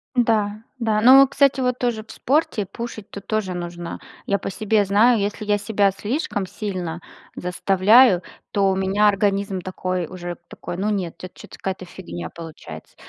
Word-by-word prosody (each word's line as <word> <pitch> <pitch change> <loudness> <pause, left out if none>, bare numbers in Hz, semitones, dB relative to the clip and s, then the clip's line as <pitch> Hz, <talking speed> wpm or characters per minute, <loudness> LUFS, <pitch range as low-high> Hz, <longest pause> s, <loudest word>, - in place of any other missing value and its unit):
Да, 215 -3 +1 0.2
да, 220 -3 +1
но, 265 +3 +9
кстати, 275 -1 +2
вот 250 -1 0
тоже 235 -3 -1
в 220 - -13
спорте, 260 - 0
пушить 230 -3 -7
тут 200 -1 -9
тоже 205 -4 -2
нужно. 175 -1 -6 0.3
Я 200 - +2
по 195 - -5
себе 215 +1 +1
знаю, 220 +4 +4
если 205 +1 -2
я 205 0 +2
себя 205 -1 +2
слишком 205 - -3
сильно 180 -4 -5 0.3
заставляю, 195 +3 +4 0.3
то 195 -1 +2
у 190 - +1
меня 195 +2 +2
организм 200 -1 +1
такой 185 -1 -3
уже, 175 0 -7
такой: 175 - -7
ну 210 +3 0
нет, 185 -5 -2
это 185 - -8
чё-то - - -13
какая-то 190 -1 -4
фигня 85 - -8
получается. 155 - -10
200 Hz, 165 wpm, -22 LUFS, 185-220 Hz, 0.3 s, но